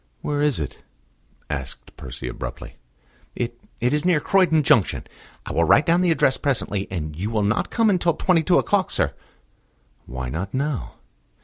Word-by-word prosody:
"Where 145 -1 -1
is 150 - +2
it?" 75 - -6 0.7
asked 65 -2 -6
Percy 65 -1 -7
abruptly. - - -7 0.6
"It 120 0 -4 0.2
it 125 +3 +1
is 150 0 +1
near 175 -3 +3
Croydon 165 -2 +3
junction. 115 -7 +3 0.4
I - - -5
will 85 - +2
write 145 - +5
down 170 +2 +3
the 180 - +2
address 135 -5 +3
presently. 110 -8 -1
And 75 -4 -4
you 95 +7 -3
will 110 -2 0
not 105 +2 0
come 230 -1 +2
until 175 -3 +2
twenty 180 -3 +2
two 175 +2 +3
o'clock, 200 -2 +1
sir?" 70 -3 0 0.9
"Why 65 0 -5
not 90 - -4
now?" 140 -1 -2
125 Hz, 170 wpm, -23 LUFS, -, 0.9 s, write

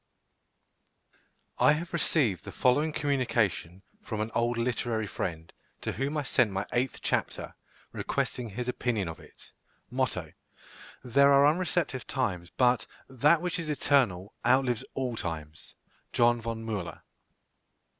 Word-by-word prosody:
I - - +6
have 170 +3 -4
received 125 - +1
the - - -8
following 145 +5 +2
communication 115 - 0 0.2
from 110 - -5
an 110 +1 -2
old 120 0 +1
literary 115 -2 -1
friend, 80 -4 -5 0.3
to - - -2
whom 140 +6 -2
I 150 - 0
sent 130 -3 +3
my 95 0 -2
eighth 125 +1 0
chapter, - - -1 0.4
requesting 120 -3 -2
his 120 +5 -5
opinion 120 -6 -1
of 80 - -6
it: - - -17 0.4
MOTTO. - - -1 0.7
There 140 +3 +5
are 140 0 +7
unreceptive 155 -5 +1
times, 90 -10 -2
but 125 0 +2 0.2
that 145 +6 +3
which 180 0 -1
is 165 -2 -4
eternal 120 -10 +2
outlives 125 -1 +3
all 130 -3 -1
times. 80 -6 -6 0.4
JOH. 120 0 +5
VON 115 0 -4
MÜLLER. 105 -6 -4
120 Hz, 130 wpm, -29 LUFS, 105-140 Hz, 0.7 s, are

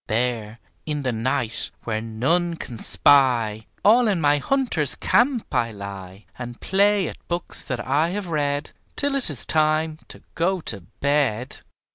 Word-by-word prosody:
There, 115 -1 -1 0.3
in 150 -2 -2
the 130 - 0
night, 115 0 +1
where 110 -1 -2
none 160 +11 0
can 120 -8 -8
spy, 110 - +3 0.2
All 230 +3 +6
in 200 -5 +1
my 145 -1 +3
hunter's 230 - +2
camp 245 -1 +1
I 115 -1 +1
lie, 100 -1 -9
And 120 -1 -7
play 200 0 +2
at - - -7
books 175 0 -3
that 130 -2 -4
I 150 +5 +2
have 200 +2 -4
read 145 -3 -2 0.2
Till 285 -1 +1
it 275 -7 +2
is 140 -7 -2
time 155 0 +1
to - - -11
go 185 +3 0
to 100 -10 -6 0.2
bed. 135 -4 0
145 Hz, 155 wpm, -23 LUFS, 115-175 Hz, 0.3 s, All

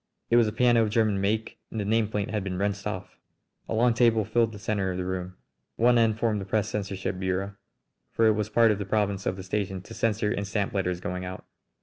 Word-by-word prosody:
It - - +5
was 120 -2 +5
a - - -1
piano 120 +1 +4
of 110 - +2
German 105 -2 +2
make, 110 +3 -1
and 110 - -5
the - - -1
nameplate 105 -1 0
had 105 -3 -1
been 95 -2 -3
wrenched 100 +1 -1
off! 95 -3 -6 0.5
A - - -1
long 120 +1 +4
table 115 -3 +3
filled 115 +1 +2
the 105 - -9
centre 100 -2 -1
of 90 - -4
the 90 - -2
room. 90 0 -4 0.4
One 120 +1 +4
end 110 -2 +3
formed 110 -3 0
the - - -5
press 105 +1 0
censorship 95 -3 -3
bureau, 95 +1 -2 0.6
for 115 - +2
it 110 - +6
was 105 0 -2
part 115 0 +5
of 105 - -1
the 100 - -3
province 100 -1 0
of 95 - 0
the 95 - -8
station 95 0 -2
to - - -11
censor 105 -1 0
and 100 -1 -2
stamp 100 0 -1
letters 90 -3 -1
going 90 +1 -4
out. 90 0 -7
105 Hz, 240 wpm, -27 LUFS, 95-110 Hz, 0.6 s, it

